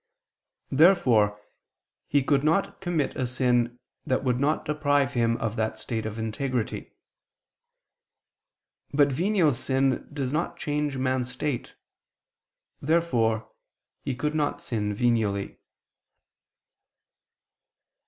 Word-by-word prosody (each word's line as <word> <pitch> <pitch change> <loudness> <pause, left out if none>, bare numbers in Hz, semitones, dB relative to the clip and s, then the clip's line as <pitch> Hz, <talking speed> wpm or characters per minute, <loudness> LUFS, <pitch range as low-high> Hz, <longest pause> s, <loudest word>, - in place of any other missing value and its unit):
Therefore 125 - +4 0.7
he 145 -1 +2
could 140 0 +2
not 165 +7 +1
commit 175 -6 -1
a 130 - -1
sin 120 -1 +1 0.3
that 130 - 0
would 125 -2 +1
not 150 +3 +1
deprive 145 -3 +1
him 115 -1 +1
of 115 -1 -3
that 110 0 -1
state 110 0 -3
of 110 0 -6
integrity. 115 +2 -3 2.0
But 145 0 +4
venial 175 +1 +2
sin 130 +1 0
does 140 -2 -3
not 170 +2 -1
change 150 -3 -2
man's 130 -1 0
state. 130 0 -3 1.1
Therefore 115 -9 +1 0.5
he 135 -3 -3
could 150 +4 -2
not 150 -2 0
sin 105 -3 -2
venially. 105 -4 0
130 Hz, 105 wpm, -26 LUFS, 115-150 Hz, 2.0 s, Therefore